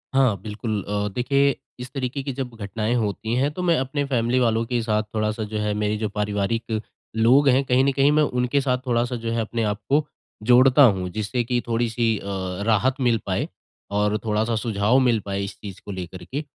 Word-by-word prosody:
हाँ, 130 -7 +4
बिल्कुल 105 0 -3
अ, 105 0 -2
देखिए 140 +2 +2 0.2
इस 125 0 -7
तरीके 135 0 -3
की 135 - -3
जब 125 -3 -5
घटनाएँ 110 +2 -2
होती 110 0 -1
हैं 135 +4 +1
तो 180 +4 -5
मैं 170 -2 +3
अपने 135 +2 -1
फ़ैमिली 125 -1 +1
वालों 115 -2 +2
के 120 0 -1
साथ 110 -1 +1
थोड़ा-सा 110 0 -1
जो 110 - -2
है 105 0 0
मेरे 105 0 -1
जो 105 0 -2
पारिवारिक 105 +2 -2 0.4
लोग 130 +6 +5
हैं 130 +2 +4
कहीं 130 0 +3
न 140 - +3
कहीं 140 +2 +3
मैं 150 0 +4
उनके 125 0 +1
साथ 130 -2 +1
थोड़ा-सा 120 +1 +1
जो 115 -1 -3
है 115 - 0
अपने 115 +1 -2
आप 105 -1 -1
को 145 +2 +3 0.4
जोड़ता 130 +3 +7
हूँ, 95 -7 +3
जिससे 110 +5 -2
कि 120 0 0
थोड़ी-सी 115 -1 0
अ, - - -9 0.4
राहत 125 +4 +3
मिल 120 -3 +3
पाए 95 -1 -1 0.4
और 105 +1 +1
थोड़ा-सा 110 +1 0
सुझाव 110 +2 +2
मिल 115 -2 +3
पाए 100 0 -2
इस 100 - -6
चीज़ 100 -3 -9
को 100 - -6
लेकर 90 -1 -7
के। 135 - -4
115 Hz, 205 wpm, -23 LUFS, 105-130 Hz, 0.4 s, जोड़ता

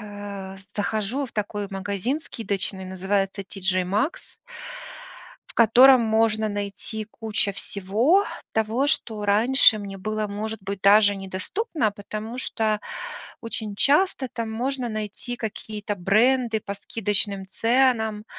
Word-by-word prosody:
э, 205 -2 -7 0.2
захожу 220 +6 -1
в - - -15
такой 210 -1 -3
магазин 200 +7 -2
скидочный, 200 -7 -2
называется 195 +1 -1
TJ 190 -1 -1
Maxx 210 - -2 1.1
в - - -15
котором 245 +3 +7
можно 220 -1 +2
найти 205 +2 -3
куча 215 -2 -1
всего 210 - +1 0.3
того, 220 +5 +1
что 220 -8 0
раньше 220 +2 +5
мне 200 -1 -6
было, 215 +2 -2
может 215 +2 -4
быть, 195 0 -5
даже 205 0 +6
недоступно, 210 - -2
потому 215 +3 -7
что 220 -4 0 0.6
очень 220 -3 -4
часто 290 - +2
там 230 -2 -3
можно 250 +1 -2
найти 215 +3 -5
какие-то 210 -2 -5
бренды 225 +5 +2
по 200 - -5
скидочным 200 -1 -1
ценам. 225 -1 +2
215 Hz, 115 wpm, -24 LUFS, 200-230 Hz, 1.1 s, котором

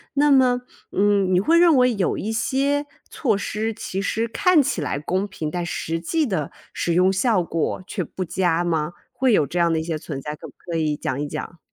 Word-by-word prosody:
那 290 +1 +4
么， 255 -3 +4 0.3
嗯， 200 -2 +2
你 180 - +5
会 325 - +3
认 335 -4 +6
为 250 -1 +4
有 195 -3 0
一 220 +2 -3
些 280 +5 0 0.2
措 225 -8 0
施 220 +2 -2
其 195 -3 -4
实 225 +3 -1
看 320 +7 +4
起 270 - -1
来 145 -1 -2
公 185 +6 -1
平， 165 -6 -5
但 175 +1 -3
实 165 -1 -3
际 310 - 0
的 185 - -2 0.2
使 170 - -1
用 185 +2 +4
效 210 0 +2
果 165 0 -2
却 - - -3
不 185 - -5
佳 175 -1 +1
吗？ 160 -2 0 0.2
会 260 0 +2
有 155 -9 +3
这 175 - -5
样 170 -1 +3
的 160 - +1
一 - - -3
些 165 -1 -2
存 150 -2 -6
在， 150 +2 -5
可 - - -10
不 - - -19
可 170 - -6
以 155 -2 0
讲 130 - -3
一 - - -1
讲？ 170 - -6
190 Hz, 240 characters per minute, -23 LUFS, 165-245 Hz, 0.3 s, 认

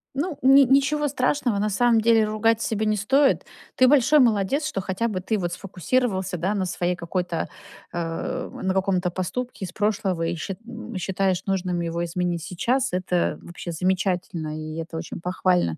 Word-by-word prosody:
Ну, 300 +1 -2
ни 270 +2 +7
ничего 275 +3 +3
страшного, 255 -4 0
на 210 +1 +1
самом 230 +2 +3
деле 225 -1 +4
ругать 220 +1 +1
себя 220 -1 -1
не 215 0 +1
стоит. 270 +8 +3 0.3
Ты 255 - +5
большой 295 +2 +5
молодец, 240 +5 +2
что 195 -10 -3
хотя 190 +5 -1
бы 195 -5 -3
ты 215 +4 -1
вот 175 -2 -2
сфокусировался, 190 0 -1
да, 185 +5 0
на 195 -3 -1
своей 180 0 -1
какой-то, 175 -1 -2 0.5
а, 175 +10 -3
на 190 0 -2
каком-то 190 -2 +1
поступке 190 +7 -4
из 180 - -5
прошлого 200 -3 0
и 165 +1 -1
счит 185 +3 -5
м, 235 -1 -8
и - - -1
считаешь 190 0 0
нужным 185 -2 -1
его 170 0 -2
изменить 175 -1 -2
сейчас. 245 +10 0
Это 180 -1 0
вообще 175 0 -7
замечательно, 180 -2 -1
и 155 0 -6
это 165 0 -7
очень 165 0 -6
похвально. 180 - +1
190 Hz, 175 wpm, -24 LUFS, 180-235 Hz, 0.5 s, ни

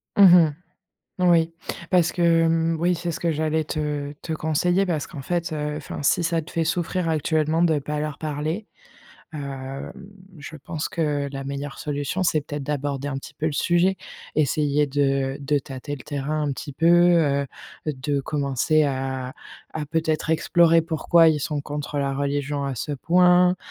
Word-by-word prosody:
Mmh 200 - +7
mh, 175 -5 +7 0.8
oui. 165 -1 +3 0.4
Parce 175 -3 +4
que, 170 -2 +3
mmh 165 0 +1
oui, 175 +1 +2
c'est 170 0 -3
ce - - -6
que 170 - +1
j'allais 155 0 0
te 150 -2 -3
te 165 - -4
conseiller, 175 +5 +1
parce 160 -5 -1
qu'en 145 -5 -8
fait, 170 +3 -2
heu, 150 -1 -3
enfin 150 -1 -6
si 170 +4 +2
ça 165 0 0
te 155 - -12
fait 165 - 0
souffrir 175 +1 -1
actuellement 160 +1 +1
de 160 -3 +3
pas 150 +1 -3
leur 150 -1 -4
parler, 155 +7 -3 0.7
hem, 135 -2 -6 0.5
je 145 +2 -9
pense 150 +2 -4
que 150 -3 -1
la 135 -1 -5
meilleure 140 0 -5
solution, 145 +5 -2
c'est 155 -4 +2
peut-être 145 0 -6
d'aborder 145 -1 -2
un 145 - -3
petit 140 - -9
peu 155 +1 -2
le - - -1
sujet. 175 +5 +2 0.4
Essayer 150 0 +2
de 135 -1 0
de 145 +1 +1
tâter 135 +2 -7
le 130 - -12
terrain 150 +1 -2
un 145 - 0
petit 140 +2 -7
peu, 165 - -1
heu, 170 -5 +4 0.4
de 145 -1 -1
commencer 145 +2 +1
à 130 -2 -2 0.4
à 155 -1 -3
peut-être 160 0 -1
explorer 165 +1 +4
pourquoi 165 0 +4
ils 155 -2 +1
sont 145 0 -2
contre, 145 0 -5
heu, - - +1
la 140 -1 0
religion 140 +1 -2
à 135 -1 -3
ce 150 - -4
point? 180 +4 +4
150 Hz, 175 wpm, -24 LUFS, 140-165 Hz, 0.8 s, Mmh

